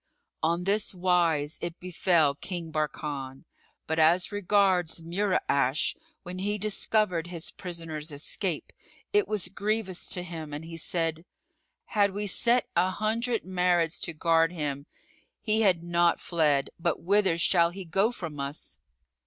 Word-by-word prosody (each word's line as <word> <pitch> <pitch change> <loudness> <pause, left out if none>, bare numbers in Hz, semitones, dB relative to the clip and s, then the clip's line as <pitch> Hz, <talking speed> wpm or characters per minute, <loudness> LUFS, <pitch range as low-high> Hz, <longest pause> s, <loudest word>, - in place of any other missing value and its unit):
On 170 +2 +1
this 200 +1 +1
wise 170 -5 +1
it 170 0 -5
befel 170 -4 +2
King 170 +2 -5
Barkan; 145 -2 -4 0.4
but 160 +1 -1
as 170 +5 +4
regards 195 -4 +2
Mura'ash, 165 -6 +1 0.3
when 180 +1 -6
he 205 +2 -1
discovered 210 -4 +1
his 170 -1 -6
prisoner's 165 -3 -5
escape, 155 +4 -3 0.4
it 415 0 +3
was 210 -4 -1
grievous 200 -2 -2
to 180 - -2
him 160 -4 -7
and 155 +2 -7
he 165 0 -8
said, 165 0 -1 0.6
"Had 200 -3 +2
we 205 +1 -2
set 235 +5 +3
an 185 +2 +2
hundred 225 +3 -1
Marids 180 -3 +1
to 170 - -2
guard 165 +1 +3
him, 145 -4 -4 0.5
he 220 0 +1
had 185 -5 +3
not 175 0 +2
fled; 150 -5 +1
but 170 -1 -1
whither 190 -2 +3
shall 170 0 +4
he 190 +2 -8
go 195 +7 +2
from 165 -10 -7
us?" 140 - -4
175 Hz, 140 wpm, -28 LUFS, 160-195 Hz, 0.6 s, as